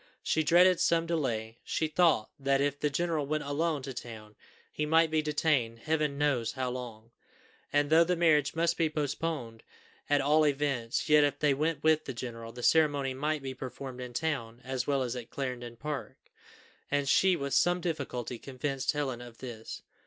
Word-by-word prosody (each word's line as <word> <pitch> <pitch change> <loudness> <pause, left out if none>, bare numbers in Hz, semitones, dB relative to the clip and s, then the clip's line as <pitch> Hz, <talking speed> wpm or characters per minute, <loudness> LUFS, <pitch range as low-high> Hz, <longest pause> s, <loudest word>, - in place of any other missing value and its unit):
She 160 - +1
dreaded 175 +3 +5
some 165 0 +2
delay; 120 -9 -2
she 160 - -1
thought 155 -7 +2
that, 135 0 +2
if 145 0 0
the 150 - +1
general 160 -1 -1
went 155 +1 -1
alone 145 0 -1
to 135 - -5
town, 110 -3 -9 0.4
he 150 - -3
might 160 +1 +3
be 155 -1 +2
detained 150 -6 0
Heaven 150 +2 -1
knows 140 -6 +1
how 130 -2 -2
long; 115 -3 -8 0.6
and 145 +1 +1
though 165 +1 +7
the 180 +2 0
marriage 155 -4 +3
must 165 +1 +1
be 165 -2 +2
postponed 145 -5 -3 0.5
at 145 0 +4
all 150 +3 +4
events, 135 -5 -1
yet 150 -1 +6
if 145 -1 +1
they 145 -2 +2
went 150 +1 -1
with 155 0 +3
the 135 - -5
general, 115 -1 -6
the 120 +1 -9
ceremony 145 -4 +3
might 150 +2 -2
be 135 -1 -4
performed 130 0 -7
in 125 -1 -7
town 120 -6 -2
as 130 -1 -3
well 140 -2 +1
as 125 0 -3
at 120 -2 -7
Clarendon 125 -3 -5
Park; 145 +3 -5 0.7
and 145 -1 0
she 185 +6 +4
with 140 -4 -3
some 175 0 +3
difficulty 135 -8 -4
convinced 135 +1 -2
Helen 135 -5 -2
of 120 -1 -11
this. 115 -4 -8
140 Hz, 180 wpm, -30 LUFS, 125-155 Hz, 0.7 s, though